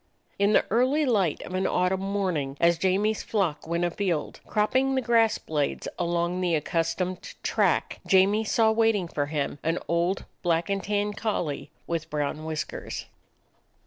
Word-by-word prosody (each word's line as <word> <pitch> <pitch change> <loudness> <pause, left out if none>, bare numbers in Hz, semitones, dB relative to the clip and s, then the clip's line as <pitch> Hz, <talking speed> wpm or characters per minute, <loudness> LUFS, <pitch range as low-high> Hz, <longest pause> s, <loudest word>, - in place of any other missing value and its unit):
In 200 +1 +3
the - - +4
early 260 +7 +3
light 200 - +1
of 180 - -8
an 185 +1 +1
autumn 180 +1 +1
morning, 185 -9 -1
as 170 -1 +3
Jamie's 200 +4 +1
flock 180 -9 -1
went 170 +1 0
afield, 175 -3 -2
cropping 260 +6 +2
the 260 - +2
grass 230 -2 +3
blades 150 -3 -2
along 175 +1 0
the 175 -2 +2
accustomed 165 +4 -2
track, - - +1
Jamie 195 +3 +4
saw 220 +1 +3
waiting 220 -4 +2
for 145 -3 -2
him 145 -1 -2
an 165 +2 0
old 170 +3 0 0.2
black 170 +1 +1
and 195 -1 -1
tan 205 0 0
collie 200 -9 -2 0.2
with 165 -2 -3
brown 150 +1 -2
whiskers. 155 -1 -4
185 Hz, 150 wpm, -26 LUFS, 165-210 Hz, 0.2 s, the